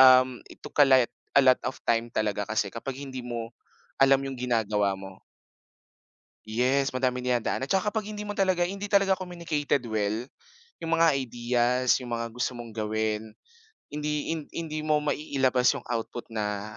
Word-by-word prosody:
um, 130 -1 +7
it - - -15
took - - -10
a 140 - +9
light 130 -3 +5 0.2
a 140 - +7
lot 130 -1 +6
of 130 - -5
time 115 0 +1
talaga 105 -1 0
kasi 105 -2 -1
kapag 130 +5 -5
hindi 135 -2 -6
mo 115 -1 -4 0.5
alam 135 0 +5
'yung 135 -1 -5
ginagawa 110 -5 +1
mo. 95 0 -11 1.2
Yes, 130 +5 +1
madami 130 -1 +1
dinadaanan. 125 +1 0
Tsaka 195 +6 +1
kapag 215 0 -3
hindi 210 - -5
mo 205 0 -5
talaga 185 -2 +2
hindi 200 +3 -2
talaga 195 -2 +3
communicated 170 -6 -1
well, 110 +1 -1 0.6
yung 165 0 -4
mga 165 0 +5
ideas, 125 0 +1
yung 120 -2 -4
mga 115 0 -3
gusto 125 +2 -2
mong 120 -1 -8
gawin, 110 0 -2 0.6
hindi 150 +1 -2
hin 165 - -1
hindi 160 -2 -4
mo 150 -1 +3
mai-ilabas 135 -4 +2
yung - - -5
output 120 0 -4
na 105 0 -3
125 Hz, 165 wpm, -27 LUFS, 115-150 Hz, 1.2 s, a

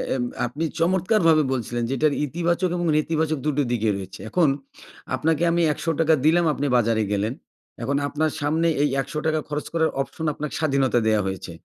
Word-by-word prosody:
এব 125 - -1 0.2
আপনি 140 +7 -4 0.2
চমৎকারভাবে 170 -2 +3
বলছিলেন 120 -1 -2
যে, - - -1
এইটার 145 +3 +2
ইতিবাচক 170 +4 0
এবং 175 0 -1
নেতিবাচক 155 0 0
দুটো 145 -1 +1
দিকই 110 -3 +1
রয়েছে। 95 -1 -8
এখন 175 +2 +3 0.7
আপনাকে 160 +1 0
আমি 170 +1 +2
৳১০০ 165 0 +1
দিলাম, 170 +2 +4
আপনি 145 0 -2
বাজারে 115 -2 +2
গেলেন। 105 +3 0 0.5
এখন 140 +1 0
আপনার 155 +2 0
সামনে 160 +3 +1 0.2
এই 145 - +2
৳১০০ 155 +2 -1
খরচ 150 0 -3
করার 160 -1 +2
অপশন 160 +4 -5
আপনাকে 150 +1 -5
স্বাধীনতা 135 -5 +2
দেওয়া 110 -1 +3
হয়েছে। 95 -2 -5
150 Hz, 165 wpm, -23 LUFS, 125-165 Hz, 0.7 s, দিলাম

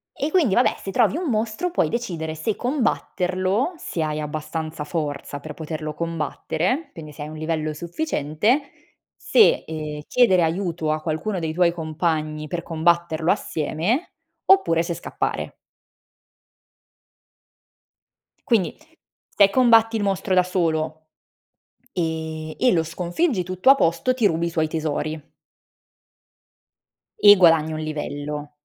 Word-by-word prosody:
E 295 +3 -2
quindi 305 - +3
vabbè 245 - +3
se 195 - -6
trovi 235 +2 +2
un 345 -3 -2
mostro, 225 +10 -1
puoi 345 - +1
decidere 170 -10 -3
se 195 +7 -2
combatterlo, 205 - -1
se 170 - -4
hai 155 -1 -1
abbastanza 155 +1 -4
forza 145 -3 -4
per 155 +2 -8
poterlo 155 -1 -5
combattere, 165 - -2
quindi 155 -2 -9
se 150 - -11
hai - - -6
un 155 - -8
livello 155 -1 -2
sufficiente, 175 - 0 0.5
se, 440 - +4
ehm, 155 -1 -5
chiedere 210 -8 +4
aiuto 165 -2 -1
a 155 0 -1
qualcuno 170 +5 -2
dei 160 -2 -3
tuoi 175 0 +3
compagni, 155 -2 -2
per 170 +1 -4
combatterlo 170 0 +1
assieme 175 - -1 0.3
oppure 275 - +4
se 170 +1 -2
scappare. 170 - -3 2.9
Quindi, 205 -9 +2 0.5
se 200 -1 +4
combatti 225 -1 +4
il 210 - -2
mostro 195 -1 0
da 185 - +6
solo 160 -3 -1 0.8
e 160 -2 -3
e 250 - +3
lo 165 -3 +2
sconfiggi, 180 - -1
tutto 185 +7 +1
a 275 - +9
posto, 170 +2 +1
ti 245 -4 0
rubi 170 -3 +2
i - - -1
suoi 160 -2 0
tesori 155 -1 -3 1.9
e 205 0 +9
guadagni 165 -4 +4
1 155 - -4
livello. 150 -1 -5
165 Hz, 130 wpm, -23 LUFS, 155-205 Hz, 2.9 s, a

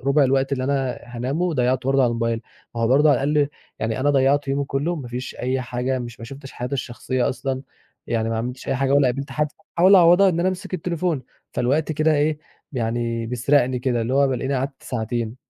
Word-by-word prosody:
رُبع 140 +2 +3
الوقت 135 +1 +1
اللي 130 -1 0
أنا 135 -2 -1
هانامه 125 +7 -3
وضيّعته 130 -6 +1
برضه 135 0 +4
على 120 - +2
الmobile. 115 -1 -1 0.3
ما 115 - -3
هو 115 - +2
برضه 145 +4 +5
على 135 - +2
الأقل 145 -1 +2 0.3
يعني 110 +2 -2
أنا 145 +2 +3
ضيّعت 140 +1 +2
يومي 140 +1 0
كُلّه، 145 +6 -1
ما 130 -5 -7
فيش 125 +2 -5
أي 130 +1 -1
حاجة 125 +1 -2
مش 120 -1 -7
ما - - -6
شُفتش 135 +2 -10
حياتي 125 +3 -4
الشخصية 125 0 -2
أصلًا، 130 +1 -3 0.4
يعني 115 -1 0
ما 110 - -1
عملتش 125 +3 -5
أي - - +1
حاجة 135 +1 +1
ولا 140 -2 +5
قابلت 140 +3 -3
حد. 150 0 0 0.3
أحاول 185 +3 +7
أعوَّضها 180 +2 +7
إن 170 -1 0
أنا 185 - +2
أمسك 190 +1 -4
التليفون، 170 -4 -1 0.3
فالوقت 145 +6 +1
كده 155 +1 +2
إيه، 150 +1 +1 0.3
يعني 115 -1 -2
بيسرقني 125 +1 +2
كده، 125 -1 0
اللي 125 +4 -1
هو 140 0 +4
بالاقيني 130 +1 -1
قعدت 135 +1 -3
ساعتين. 115 0 -3
135 Hz, 210 wpm, -22 LUFS, 125-145 Hz, 0.4 s, أحاول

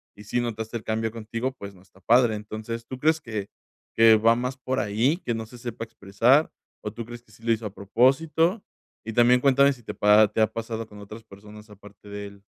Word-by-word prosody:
y 105 - -13
sí 105 +4 -1
notaste 115 -1 -4
el 110 - -10
cambio 110 0 -1
contigo, 115 +3 -4
pues, 100 -6 -10
no 90 - -19
está 95 0 -23
padre, 115 +2 +3
entonces, 110 +2 -6
¿tú 130 - -7
crees 160 +4 +2
que 110 -7 -6 0.5
que 115 -1 +7
va 115 +2 +4
más 125 +2 -3
por 130 +1 -2
ahí, 115 +10 +1
que 120 - -3
no 115 0 -4
se 120 +3 -14
sepa 120 -1 -6
expresar, 115 +7 +2 0.3
o 105 - -4
tú 115 +1 -7
crees 120 0 -10
que 110 - -25
sí 110 +2 -20
lo 115 - +1
hizo 115 0 -4
a 100 - -5
propósito? 155 - +2 0.4
Y 115 - -5
también 120 +2 +5
cuéntame 140 +1 +4
si 120 - -17
te - - -6
pa 105 +1 +5
te 110 - -1
ha 110 - +2
pasado 115 0 -5
con 105 -1 -14
otras 110 +2 -11
personas 105 +1 -14
aparte 105 0 -15
de 100 0 -6
él. 100 0 -15
115 Hz, 230 wpm, -25 LUFS, 105-120 Hz, 0.5 s, que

